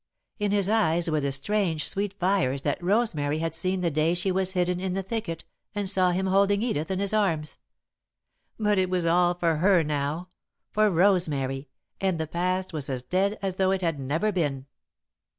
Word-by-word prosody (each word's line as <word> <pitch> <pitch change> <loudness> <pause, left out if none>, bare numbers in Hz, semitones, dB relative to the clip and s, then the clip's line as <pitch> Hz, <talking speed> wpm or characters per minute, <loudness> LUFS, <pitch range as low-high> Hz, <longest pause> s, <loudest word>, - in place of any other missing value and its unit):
In 205 0 0
his 200 -1 +3
eyes 175 -6 +2
were 155 - +1
the 140 0 -1
strange, 160 +2 0
sweet 200 0 -2
fires 180 -8 +1
that 145 +4 -1
Rosemary 175 -7 +1
had 165 +1 -2
seen 185 0 -1
the 170 -2 0
day 155 +3 +1
she 180 +2 +1
was 190 0 0
hidden 180 -1 0
in 185 0 -2
the 195 - -2
thicket 190 -5 -4 0.3
and 205 -1 -1
saw 185 -1 +2
him 185 +2 0
holding 200 +2 +3
Edith 160 -10 -1
in 190 - -1
his 200 +1 -1
arms. 165 -8 0 1.0
But 210 -2 +2
it 185 -1 +1
was 180 -2 0
all 175 +1 +3
for 170 -2 +1
her 180 +1 +4
now, 150 +4 -2 0.4
for 215 0 +3
Rosemary, 155 -8 +1 0.3
and 190 -3 0
the 160 - -1
past 185 +3 -2
was 145 -4 -4
as 130 -2 -3
dead 195 +7 0
as 190 -1 -2
though 190 -1 +2
it 190 0 0
had 165 -4 -1
never 155 +10 0
been. 145 -8 -1
180 Hz, 190 wpm, -26 LUFS, 155-195 Hz, 1.0 s, her